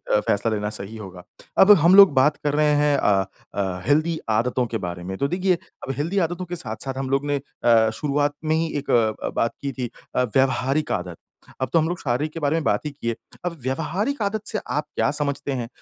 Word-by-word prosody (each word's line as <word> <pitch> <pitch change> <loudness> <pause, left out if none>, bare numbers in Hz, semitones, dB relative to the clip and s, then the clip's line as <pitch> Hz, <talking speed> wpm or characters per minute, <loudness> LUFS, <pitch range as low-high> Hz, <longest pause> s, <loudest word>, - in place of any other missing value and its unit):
अ, - - +5
फ़ैसला 105 +1 0
लेना 105 -1 -2
सही 105 +1 -6
होगा। 95 -4 -9 0.3
अब 195 +2 +8
हम 180 +3 +7
लोग 195 -6 +9
बात 140 +2 +3
कर 145 -1 0
रहे 150 0 +3
हैं 145 -1 +3
अ 95 -6 +2 0.3
अ, 95 -2 -2
हेल्दी 155 +5 +2
आदतों 120 +3 +1
के - - +1
बारे 85 0 -6
में, 95 +2 -5
तो 140 - 0
देखिए, 185 +3 +1 0.3
अब - - -1
हेल्दी 165 +7 -2
आदतों 175 +2 -5
के 175 0 -5
साथ-साथ 130 -2 -5
हम 135 -1 -3
लोगों 135 +2 0
ने 145 0 +1 0.3
अ, 115 -2 +5
शुरुआत 145 +3 0
में 155 0 +1
ही 165 +1 +1
एक 145 - -3
अ, 110 -2 +1
बात 115 - -1
की 140 - -2
थी 125 -3 -4 0.3
अ, - - +3
व्यावहारिक 135 +4 +1
आदत। 90 -1 -3 0.4
अब 130 - -1
तो 165 - +5
हम 160 - +1
लोग 175 - -3
शारीरिक 140 +4 -1
के 165 - -5
बारे 145 0 +1
में 165 - 0
बात - - 0
ही 150 - -3
किए। 115 -5 -3 0.3
अब 170 -1 -3
व्यावहारिक 175 - -2
आदत 205 +1 -1
से 215 - -1
आप 150 +1 -1
क्या - - +2
समझते 140 -1 -2
हैं? 125 -3 -3
140 Hz, 230 wpm, -23 LUFS, 115-155 Hz, 0.4 s, लोग